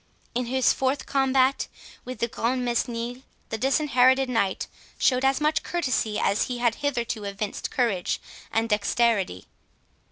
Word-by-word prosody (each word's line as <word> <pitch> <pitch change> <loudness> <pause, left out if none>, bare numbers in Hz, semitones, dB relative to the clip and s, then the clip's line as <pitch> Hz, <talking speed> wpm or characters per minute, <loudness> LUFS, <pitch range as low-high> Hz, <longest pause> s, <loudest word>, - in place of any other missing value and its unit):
In 250 0 -1
his 260 0 +3
fourth 265 +1 -1
combat 270 -1 +2 0.4
with 255 0 -6
De 235 - +2
Grantmesnil, 240 0 -1 0.3
the 220 - -2
Disinherited 265 -1 +3
Knight 200 -6 0 0.3
showed 255 0 +2
as 270 0 +3
much 305 +1 +2
courtesy 255 -10 -1
as 200 - +2
he 250 - -4
had 240 -1 +2
hitherto 235 -6 -1
evinced 200 +1 -4
courage 225 -9 0 0.3
and 225 0 +1
dexterity. 210 - +1
245 Hz, 130 wpm, -25 LUFS, 225-265 Hz, 0.4 s, his